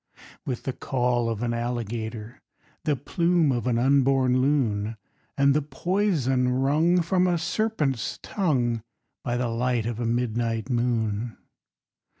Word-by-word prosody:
_With 125 -3 -3
the 135 - -2
caul 125 -3 0
of 115 0 -3
an 120 -1 0
alligator, 115 -1 -4 0.4
The 150 - +2
plume 170 +3 +1
of 120 -1 -1
an 120 -2 +2
unborn 130 0 +3
loon, 115 -6 0 0.4
And 140 0 +4
the 150 - +2
poison 145 - 0
wrung 150 +7 +2
From 180 +2 +2
a 175 -1 +2
serpent's 160 - -1
tongue 125 - 0 0.4
By 120 0 -1
the 125 0 0
light 120 0 0
of 115 -1 -3
a 120 - -1
midnight 115 0 -1
moon! 115 -2 -1
125 Hz, 135 wpm, -25 LUFS, 120-145 Hz, 0.4 s, And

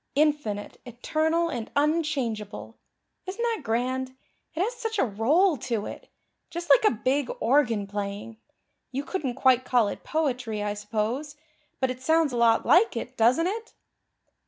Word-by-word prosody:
'Infinite, 290 -9 0
eternal 315 +7 0
and 235 -7 -4
unchangeable.' 285 -9 -1 0.5
Isn't 395 +6 -4
that 460 -5 0
grand? 255 +2 -2 0.4
It 340 - +1
has 460 +5 -1
such 450 -2 -4
a - - +3
roll 285 - +2
to 230 -4 -2
it - - -9 0.4
just 345 +1 -3
like - - +7
a - - +7
big 270 0 +1
organ 235 -5 +2
playing. 205 +2 -5 0.5
You 270 +2 -3
couldn't 285 -7 -3
quite 260 -1 +4
call 245 -5 +2
it - - -7
poetry, 250 -9 -1
I 205 0 -1
suppose, 220 +8 -3 0.4
but 260 -1 +1
it 255 0 -8
sounds 320 0 +2
a - - -1
lot 230 -1 +4
like 350 - +4
it, 245 +2 -5
doesn't 250 +8 +3
it?" 440 +5 -4
260 Hz, 155 wpm, -26 LUFS, 230-320 Hz, 0.5 s, like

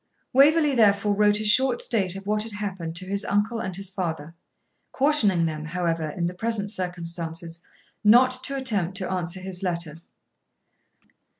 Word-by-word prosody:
Waverley 295 +2 +5
therefore 205 -3 +3
wrote 210 0 +3
a 215 - -3
short 250 +4 +3
state 195 -6 0
of 195 0 -8
what 210 +1 0
had 220 0 -5
happened 190 -5 -5
to 185 - -2
his 200 +1 0
uncle 210 +3 0
and 190 -4 -3
his 195 0 -4
father, 165 -4 -4 0.6
cautioning 220 - +3
them, 155 -1 -4
however, 165 -1 -2
in 170 +3 -3
the 175 - -2
present 210 0 -2
circumstances, 170 -3 -4 0.4
not 245 +5 +6
to 275 - -1
attempt 205 -9 +1
to 190 -2 -4
answer 180 0 -3
his 185 -1 -4
letter. 170 -4 -3
195 Hz, 160 wpm, -24 LUFS, 170-215 Hz, 0.6 s, not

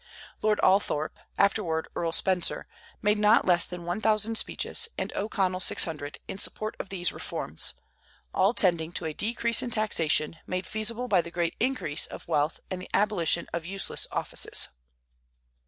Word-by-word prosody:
Lord 215 -1 +2
Althorp, 185 -5 +2 0.2
afterward 185 -5 +1
Earl 170 -1 -1
Spencer, 180 +1 0 0.4
made 210 0 +3
not 210 +2 +5
less 175 -2 +3
than 180 -1 -8
one 175 +5 -2
thousand 220 0 +2
speeches, 460 - +1
and - - -3
O'Connell 190 -3 0
six - - +5
hundred, 150 -3 -5
in 190 - -6
support 215 +1 -2
of - - -6
these 180 -2 +1
reforms, - - -1 0.6
all 195 +5 +3
tending 170 -6 +3
to 175 - -2
a 155 - -2
decrease 230 +5 +1
in 250 - -3
taxation, 165 -8 +1
made 185 0 -2
feasible 225 +3 -2
by 190 -6 +4
the 170 - -8
great 170 -1 -1
increase 225 - 0
of - - -10
wealth 150 +2 0
and 185 -1 -3
the - - -10
abolition 195 -5 +2
of 170 - -2
useless 195 +1 -1
offices. - - -1
190 Hz, 160 wpm, -27 LUFS, 170-215 Hz, 0.6 s, not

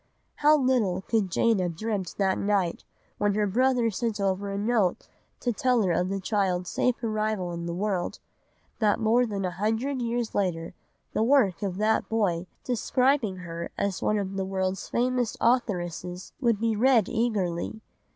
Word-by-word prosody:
How 300 +1 +5
little 245 -9 +1
could 215 -4 0
Jane 225 +4 +2
have 175 -2 -1
dreamt 205 -2 -3
that 190 -2 +1
night 200 -4 0 0.3
when 205 -1 +2
her 210 0 +2
brother 245 +2 +2
sent 220 +1 -2
over 195 0 0
a 200 - -3
note 210 -3 +1 0.3
to 245 - 0
tell 250 0 +2
her 185 - +1
of 180 +2 +1
the 195 0 -2
child's 185 -3 0
safe 250 -1 0
arrival 215 -4 -1
in 170 0 -5
the 170 - -3
world, 190 -2 -1 0.6
that 215 -2 +2
more 235 +2 +3
than 200 -3 -3
a 180 - -1
hundred 225 +8 -1
years 235 -1 -2
later 170 -4 -1 0.4
the - - 0
work 230 -7 +3
of 190 -3 -2
that 215 +2 +1
boy, 185 -6 0 0.2
describing 250 -2 +1
her 170 0 -5
as 200 -2 -1
one 215 - +1
of 195 -1 -3
the 195 - 0
world's 190 0 -2
famous 245 -1 0
authoresses, 180 -7 -1
would 235 -5 +2
be 225 -1 +1
read 235 -2 +4
eagerly. 215 -5 -1
210 Hz, 170 wpm, -27 LUFS, 185-235 Hz, 0.6 s, How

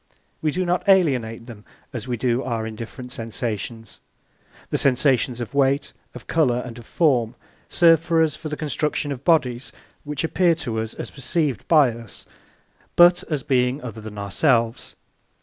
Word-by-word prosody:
(2) - - -36 0.3
We 155 - +1
do 185 +5 -1
not 180 +3 0
alienate 125 -12 +2
them 115 -4 -11 0.3
as 120 0 -5
we 125 -1 -2
do 120 +1 0
our 115 -4 -3
indifferent 115 +3 -8
sensations. 115 -1 -5 0.7
The - - 0
sensations 130 -2 +2
of 120 +2 -6
weight, 140 0 +1 0.2
of - - -10
colour, 125 -7 +1
and 120 -1 -8
of 115 - -14
form 125 -8 +1 0.3
serve 165 -1 +4
us 160 -2 +3
for 155 0 -7
the 150 - -4
construction 150 0 -2
of 135 -1 -6
bodies 130 -7 +1 0.3
which 150 0 -4
appear 170 +1 +2
to 120 -8 -4
us 110 0 -4
as - - -7
perceived 140 -1 -2
by 150 -6 +5
us, 115 -2 -10 0.7
but 175 +1 +6
as 150 -5 -2
being 125 0 +1
other 115 -3 -7
than 105 -1 -9
ourselves. 115 +3 0
130 Hz, 165 wpm, -23 LUFS, 115-155 Hz, 0.7 s, but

